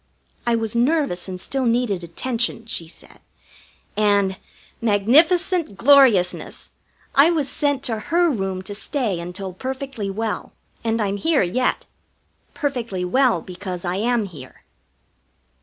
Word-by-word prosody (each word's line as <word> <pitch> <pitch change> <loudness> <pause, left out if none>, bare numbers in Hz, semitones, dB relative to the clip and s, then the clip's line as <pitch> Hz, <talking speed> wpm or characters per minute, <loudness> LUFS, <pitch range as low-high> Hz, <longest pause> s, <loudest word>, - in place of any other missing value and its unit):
I 235 - +3
was 225 0 -2
nervous 250 - +1
and 185 -1 -6
still 265 +5 -1
needed 230 -6 +1
attention, 230 +6 -2
she 175 -7 -4
said, 160 - -13 0.8
and 200 -2 +2 0.4
magnificent 300 - +3
gloriousness! 255 -10 +3 0.4
I 280 +4 +6
was 315 -5 0
sent 285 -2 -1
to 225 -3 -1
her 345 +1 +4
room 195 -5 -3
to 205 - -7
stay 215 - -2
until 180 +2 -6
perfectly 260 -1 -5
well, 220 +2 -3 0.3
and 225 0 0
I'm 200 -2 0
here 320 +3 +2
yet. 245 +9 0 0.7
Perfectly 235 -10 -2
well 240 -1 +2
because 185 -1 -6
I 180 +1 -1
am 230 +1 +1
here! 145 -9 -12
225 Hz, 125 wpm, -22 LUFS, 190-265 Hz, 0.8 s, I